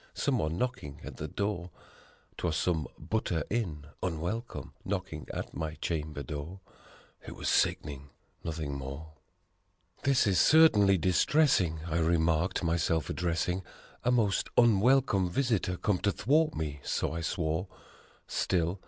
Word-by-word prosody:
Someone 80 +2 0
knocking 120 - -3
at - - -8
the 75 - -4
door! 95 +1 -2 0.7
'Twas 85 -3 -1
some 80 -4 0
butter 85 -2 -1
in, 85 -11 -2 0.2
unwelcome, 90 +7 -3
knocking 95 -5 -4
at - - -5
my 80 -1 -4
chamber 75 -2 -3
door 75 +8 -6 0.7
It - - -7
was - - -5
sick'ning, 70 -1 0 0.3
nothing 80 -3 -3
more. 70 +3 -7 0.8
6 - - -16
"This 135 -2 +4
is 95 -5 +3
certainly 105 -12 +6
distressing!" 90 - +3
I 85 -1 -1
remarked 85 +2 +1
my 85 0 +2
self 80 -3 0
addressing 90 +1 -1 0.4
"A 125 - +2
most 110 -6 +2
unwelcome 120 -3 +4
visitor 110 -5 0
come 95 -1 0
to 100 - +1
thwart 155 +9 +2
me," 75 -2 -3
so - - -1
I 85 - -3
swore. 85 +2 -1
85 Hz, 130 wpm, -30 LUFS, 80-105 Hz, 0.8 s, certainly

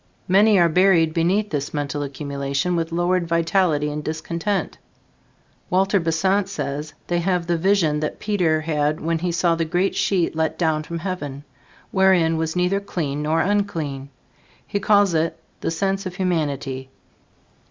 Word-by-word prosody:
Many 205 +3 +5
are 175 -2 +5
buried 170 -2 +3
beneath 185 +6 +1
this 145 0 -3
mental 145 0 -2
accumulation 140 +3 -2
with 165 -1 -2
lowered 175 +1 +1
vitality 165 -3 +1
and 150 0 -4
discontent. 170 +6 -3 0.9
Walter 190 +2 +2
Besant 190 +4 +1
says 150 -4 -4
they 175 0 0
have 180 0 +1
had - - -15
the 175 - +2
vision 170 -5 +2
that 155 - -3
Peter 180 -7 +1
had 150 -1 0
when 165 0 -1
he 175 +1 -1
saw 170 0 +2
the 165 0 0
great 175 +4 0
sheet 195 -5 0
let 160 0 -1
down 160 -3 +1
from 170 +2 -6
heaven, 155 -6 -5 0.5
wherein 185 -4 +3
was 160 +1 -2
neither 180 +2 +1
clean 155 -8 -3
nor 155 +2 +1
unclean. 165 -9 -1 0.6
He 200 - -2
calls 200 -2 +3
it 160 0 0 0.2
the - - -2
sense 195 +4 -1
of 180 - -8
humanity. 145 -8 -2
165 Hz, 155 wpm, -22 LUFS, 155-190 Hz, 0.9 s, Many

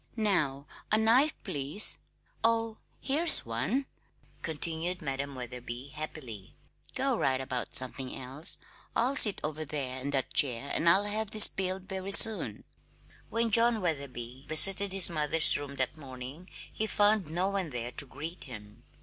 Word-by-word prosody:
"Now 160 - -1 0.3
a 215 - +4
knife, 245 +7 +3
please, 150 +1 -2 0.4
oh, 225 -1 0 0.2
here's 315 +4 +3
one," 130 - -2 0.6
continued 165 +3 -2
Madam 140 -1 -5
Wetherby 125 +1 -8
happily. 135 -9 -8 0.4
"Go - - 0
right 130 -1 0
about 130 -2 -4
something 130 0 0
else. 135 +7 -3 0.4
I'll 255 +4 0
sit 210 -7 +4
over 155 +1 -4
there 135 -4 -5
in 140 - -5
that 135 -1 -2
chair, 135 -1 -2
and 170 - +2
I'll 190 +4 +4
have 210 +1 -2
these 215 0 +5
peeled 190 0 -5
very 190 +1 -7
soon." 195 - +5 0.7
When 230 0 -2
John 230 +1 +6
Wetherby 135 - -5
visited 195 +5 +6
his 190 -2 +6
mother's 155 -1 +6
rooms 140 -1 -6
that 130 +3 -1
morning 135 +4 -10 0.2
he 220 - -2
found 205 -5 +1
no 180 +4 -1
one 195 -4 -3
there 120 -2 -6
to 145 - -2
greet 165 +7 -8
him. 105 -5 -12
155 Hz, 150 wpm, -29 LUFS, 130-200 Hz, 0.7 s, John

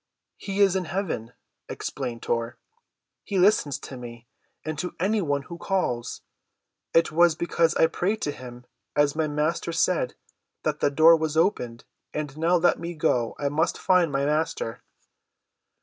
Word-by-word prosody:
"He 200 0 -2
is 195 -2 +5
in 185 -1 0
heaven," 155 - -3 0.4
explained 120 -4 -5
Tor. 115 0 -2 0.7
"He 200 - -3
listens 180 -7 +3
to 130 - -8
me, 120 -1 -9 0.4
and 155 0 -3
to 180 - -4
any 205 +4 +1
one 145 -4 -1
who 170 +3 -9
calls. 170 -13 -2 0.7
It 165 -1 +3
was 170 0 +4
because 170 0 +1
I - - +5
prayed 190 +6 -1
to 145 - 0
him, 125 -2 -10 0.3
as 145 0 +3
my 160 -1 +1
Master 150 +3 -1
said, 165 -5 +1 0.5
that - - -1
the - - +3
door 160 +4 +7
was 160 -1 -2
opened. 125 - 0 0.3
And 150 -2 -3
now, 165 +3 +2
let 175 0 +3
me 170 +1 -5
go. 120 -6 +1
I 145 - -1
must 160 +4 0
find 180 -4 +3
my 140 0 0
Master." 150 -6 -1
155 Hz, 160 wpm, -25 LUFS, 140-175 Hz, 0.7 s, door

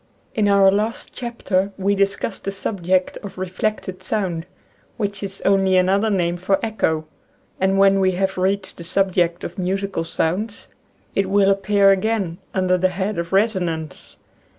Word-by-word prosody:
In 210 -2 +1
our 200 -1 +6
last 210 +3 -2
chapter 205 -5 -2
we 200 +1 +1
discussed 200 +1 -1
the 195 - -1
subject 185 -2 -1
of 200 -3 -9
reflected 185 0 -3
sound, 185 -4 -2 0.5
which 200 -2 -3
is 195 -1 -6
only 195 -1 +4
another 195 +4 +3
name 175 -4 0
for 190 +2 +1
Echo, 160 -8 0 0.5
and 190 +1 +2
when 195 0 +5
we 190 -1 +2
have 190 +1 -1
reached 190 +1 -1
the 170 - -8
sub 190 +3 +1
ject 175 -1 0
of 175 - -6
musical 190 -1 -1
sounds 190 +7 -2 0.5
it 195 -1 0
will 200 0 +4
appear 195 0 +4
again 195 -3 0
under 185 -1 +1
the 185 +1 +3
head 190 +1 -2
of 170 0 -4
Resonance. 180 -7 -1
195 Hz, 155 wpm, -21 LUFS, 185-200 Hz, 0.5 s, our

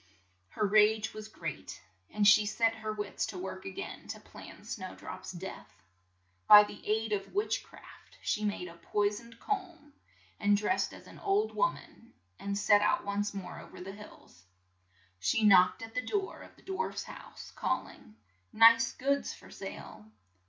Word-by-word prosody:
Her 210 - -1
rage 215 +1 +4
was 215 0 -8
great, 165 -8 -7 0.3
and 210 -1 +2
she 205 +1 +8
set 225 +2 +2
her 215 -1 -5
wits 210 -2 -3
to 190 - -7
work 190 +1 -6
a - - -3
gain 190 - -7
to - - -6
plan - - -13
Snow 185 -5 -6
drop's - - -8
death. 185 +1 -9 0.6
By 210 0 +11
the 205 - -9
aid 220 +1 0
of 200 - -4
witch 415 +2 0
craft, - - -16
she 215 - -1
made 205 -3 -2
a 170 -1 -12
poi 205 +3 +1
soned 230 +2 -10
comb, 345 -8 -4 0.5
and 205 0 +4
dressed 210 - 0
as - - -12
an - - -13
old 410 +2 +1
worn - - +1
an, 235 +2 -17 0.3
and 200 0 -3
set 205 0 +5
out 210 - +2
once 205 0 -1
more 195 -2 -6
o - - -11
ver - - -13
the 185 +2 -7
hills. 200 - -15 0.7
She 95 - +1
knocked 185 0 +6
at 225 0 -9
the 250 - 0
door 385 - -3
of - - -14
the - - -22
dwarfs' 385 +5 -3
house, - - -11
call - - -1
ing, 105 - -16 0.4
"Nice 230 +1 +6
goods 280 +2 -1
for - - -16
sale!" 215 - -9
210 Hz, 180 wpm, -31 LUFS, 200-230 Hz, 0.7 s, By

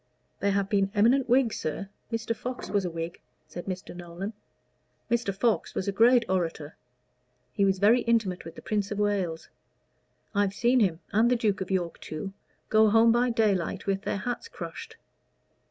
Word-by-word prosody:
"There 200 0 +1
have 200 -1 +1
been 195 -1 +1
eminent 245 +5 +3
Whigs, 245 -2 +3
sir. 155 +6 -3 0.2
Mr. 230 0 -2
Fox 250 -5 -6
was 200 -2 +1
a - - -1
Whig," 165 0 -6 0.2
said 175 - -9
Mr. 185 -1 -5
Nolan. 175 +4 -6 0.8
"Mr. 235 -4 +1
Fox 210 +4 0
was 190 - -2
a - - +2
great 235 +4 +5
orator. 165 -5 -2 0.8
He 200 - +2
was 190 -1 +2
very 215 +6 +5
intimate 220 -7 0
with 165 - -10
the - - -11
Prince 205 -2 -1
of 205 - -4
Wales. 195 -6 -1 0.8
I've 200 -1 +1
seen 240 +4 +3
him, 180 -7 +1
and 225 +3 +4
the 250 - +3
Duke 210 -5 0
of 190 - -4
York 180 -3 -1
too, 190 +5 -6 0.4
go 220 0 +5
home 225 +2 +5
by 240 +2 +3
daylight 200 -5 0
with 195 -1 0
their 200 - -2
hats 245 - -4
crushed. - - -8
200 Hz, 175 wpm, -27 LUFS, 185-230 Hz, 0.8 s, great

